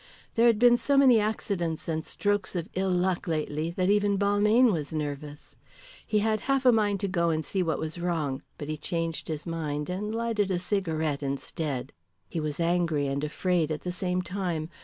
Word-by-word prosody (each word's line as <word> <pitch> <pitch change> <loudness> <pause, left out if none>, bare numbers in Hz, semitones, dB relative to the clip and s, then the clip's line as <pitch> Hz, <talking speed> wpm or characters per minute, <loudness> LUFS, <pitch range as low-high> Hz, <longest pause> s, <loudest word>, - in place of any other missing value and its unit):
There 230 +1 +4
had 230 -2 +4
been 240 +1 +6
so 280 +3 +1
many 260 -4 +7
accidents 195 -6 -2
and 160 -1 -1
strokes 205 0 -1
of 170 -1 -2
ill 190 +1 0
luck 180 +1 0
lately 155 0 -1
that 185 +1 +3
even 205 -1 +2
Balmayne 210 +4 +4
was 150 -4 -3
nervous. 150 -1 -5 0.5
He 215 - 0
had 215 -1 +1
half 270 -1 +2
a 250 - +8
mind 205 -3 +2
to 200 - 0
go 170 -3 +1
and 155 -1 -1
see 190 - -1
what 165 -3 0
was 160 +2 -5
wrong, 155 -6 -1 0.2
but 145 - -6
he 155 0 -3
changed 165 +1 -3
his 155 -1 -4
mind 155 -2 -3
and 205 +4 -3
lighted 225 -3 0
a 185 - +1
cigarette 160 -6 -1
instead. 140 -1 -3 0.3
He 165 - -4
was 150 -1 -3
angry 170 -3 +1
and 140 +1 -2
afraid 165 +1 0
at 155 -1 -3
the 180 - -3
same 180 0 -1
time. 175 -3 -3
175 Hz, 195 wpm, -28 LUFS, 155-205 Hz, 0.5 s, a